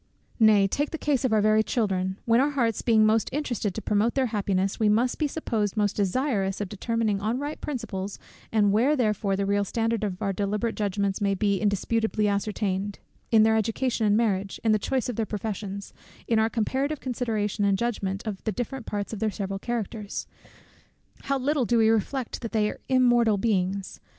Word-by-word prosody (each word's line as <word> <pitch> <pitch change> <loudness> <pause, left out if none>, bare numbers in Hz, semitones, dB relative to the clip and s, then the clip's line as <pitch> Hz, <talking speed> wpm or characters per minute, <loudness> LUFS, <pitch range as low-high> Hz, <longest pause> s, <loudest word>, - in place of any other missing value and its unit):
Nay, 215 -3 +6
take 285 +9 -1
the 320 - -4
case 285 -4 0
of 255 - +1
our 215 -1 +4
very 215 0 +4
children, 190 -5 -1
when 235 +1 +4
our 285 - +2
hearts 235 -7 0
being 220 -2 +4
most 220 +1 +2
interested 240 -8 -2
to 220 - -5
promote 210 +3 +1
their 265 -1 +2
happiness, 195 -2 0
we 215 -2 +3
must 235 +4 +2
be 305 - +2
supposed 225 -9 -2
most 205 -1 +1
desirous 200 -1 0
of 205 -3 -3
determining 215 0 -1
on 220 +4 0
right 290 +3 -5
principles, 205 -8 -4 0.3
and 210 -2 +3
where 245 +9 +3
therefore 210 -5 +1
the 200 +1 -1
real 200 0 +1
standard 225 +2 -1
of 190 -3 -3
our 195 -2 -1
deliberate 210 +3 -1
judgments 200 -1 -1
may 200 -1 +2
be 200 0 +1
indisputably 215 +1 +1
ascertained: 200 -1 -1 0.3
in 220 -2 +6
their 220 0 +4
education 225 +1 0
and 205 +1 +4
marriage, 200 -4 0
in 225 - +3
the 215 - +3
choice 260 +4 -1
of 245 - -4
their 225 - +1
professions, 200 -2 -5 0.3
in 225 -2 +3
our 220 +1 +3
comparative 265 +6 -1
consideration 225 -5 -2
and 200 -1 +3
judgment 200 -3 -2
of 205 -3 -5
the 220 - -1
different 245 +3 -5
parts 205 +1 -3
of 215 - -5
their 220 0 +1
several 195 -1 -4
characters, 220 -2 -4 1.0
how 275 0 +1
little 275 +1 +1
do 235 +1 +2
we 220 -1 +5
reflect 225 +3 -1
that 230 - -6
they 210 -1 +2
are - - -11
immortal 240 -4 +4
beings! 195 -2 -1
215 Hz, 195 wpm, -26 LUFS, 200-235 Hz, 1.0 s, Nay